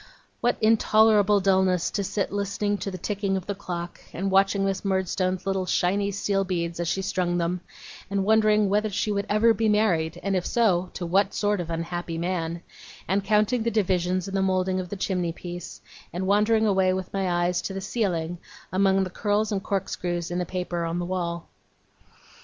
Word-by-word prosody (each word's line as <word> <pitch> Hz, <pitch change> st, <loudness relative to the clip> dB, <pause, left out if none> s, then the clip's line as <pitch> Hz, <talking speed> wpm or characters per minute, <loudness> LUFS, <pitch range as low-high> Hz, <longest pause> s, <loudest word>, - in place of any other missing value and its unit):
What 240 Hz, -, +1 dB
intolerable 215 Hz, -2 st, +4 dB
dulness 190 Hz, -2 st, +2 dB
to 200 Hz, -, -1 dB
sit 195 Hz, +1 st, -2 dB
listening 205 Hz, 0 st, -1 dB
to -, -, -3 dB
the 185 Hz, -, -6 dB
ticking 195 Hz, +1 st, -1 dB
of 185 Hz, -, -6 dB
the 205 Hz, -, -2 dB
clock; 175 Hz, -3 st, -6 dB
and 195 Hz, +3 st, -2 dB
watching 195 Hz, +1 st, +3 dB
Miss 195 Hz, -1 st, -1 dB
Murdstone's 185 Hz, -1 st, -1 dB
little 195 Hz, -1 st, -1 dB
shiny 200 Hz, +4 st, +1 dB
steel 200 Hz, 0 st, 0 dB
beads 170 Hz, -3 st, -3 dB
as 170 Hz, -, -1 dB
she 190 Hz, +3 st, -1 dB
strung 180 Hz, -2 st, 0 dB
them; 175 Hz, +1 st, -1 dB, 0.5 s
and 195 Hz, -1 st, 0 dB
wondering 215 Hz, -1 st, +4 dB
whether 210 Hz, +2 st, +1 dB
she 210 Hz, +1 st, -1 dB
would 200 Hz, -1 st, -1 dB
ever 225 Hz, +2 st, +4 dB
be 220 Hz, 0 st, +1 dB
married, 180 Hz, -7 st, +1 dB
and 195 Hz, -1 st, 0 dB
if 180 Hz, -, 0 dB
so, 185 Hz, -6 st, +1 dB
to 175 Hz, -, -4 dB
what 195 Hz, +3 st, +1 dB
sort 205 Hz, -1 st, +1 dB
of 170 Hz, -, -7 dB
unhappy 165 Hz, 0 st, -3 dB
man; 170 Hz, -1 st, -2 dB, 0.4 s
and 195 Hz, +2 st, +1 dB
counting 215 Hz, +4 st, +2 dB
the 230 Hz, -, +1 dB
divisions 185 Hz, -3 st, 0 dB
in 195 Hz, -, -6 dB
the 195 Hz, -, +1 dB
moulding 185 Hz, 0 st, +1 dB
of 180 Hz, -1 st, -5 dB
the 205 Hz, -, -4 dB
chimney 180 Hz, -3 st, -1 dB
piece; 175 Hz, 0 st, -8 dB, 0.3 s
and 180 Hz, +2 st, -3 dB
wandering 210 Hz, +3 st, +3 dB
away, 190 Hz, -3 st, +3 dB
with 185 Hz, -1 st, -4 dB
my 195 Hz, -2 st, 0 dB, 0.2 s
eyes, 175 Hz, 0 st, 0 dB
to -, -, -4 dB
the 195 Hz, -, -4 dB
ceiling, 175 Hz, -5 st, -2 dB, 0.3 s
among 195 Hz, 0 st, +3 dB
the 185 Hz, -, -3 dB
curls 210 Hz, +2 st, 0 dB
and 200 Hz, -2 st, -1 dB
corkscrews 180 Hz, -4 st, -2 dB
in 175 Hz, -, -1 dB
the 180 Hz, -, -2 dB
paper 180 Hz, -1 st, -3 dB
on 165 Hz, +1 st, -2 dB
the 175 Hz, -, -2 dB
wall! 170 Hz, -2 st, -3 dB
190 Hz, 195 wpm, -25 LUFS, 180-205 Hz, 0.5 s, intolerable